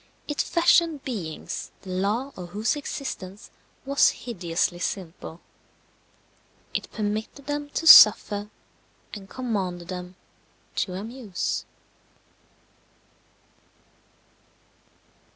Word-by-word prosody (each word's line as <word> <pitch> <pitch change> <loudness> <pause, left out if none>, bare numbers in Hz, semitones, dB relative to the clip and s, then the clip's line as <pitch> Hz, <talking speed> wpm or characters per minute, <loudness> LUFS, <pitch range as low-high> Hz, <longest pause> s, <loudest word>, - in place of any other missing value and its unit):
It 295 - 0
fashioned 335 -3 +3
beings 190 - -5
the 190 - -8
law 210 +9 -1
of 180 -1 -8
whose 210 +9 0
existence 225 -8 -6 0.3
was 280 +1 +4
hideously 175 -5 -2
simple: 175 -2 -5 1.3
it - - -3
permitted 215 +6 -4
them 290 0 -3
to 325 - -1
suffer, 210 -7 +8 0.6
and 195 -3 -9
commanded 190 -9 -3
them 180 0 -6 0.6
to 180 - -1
amuse. 215 0 -4
210 Hz, 80 wpm, -25 LUFS, 185-265 Hz, 1.3 s, suffer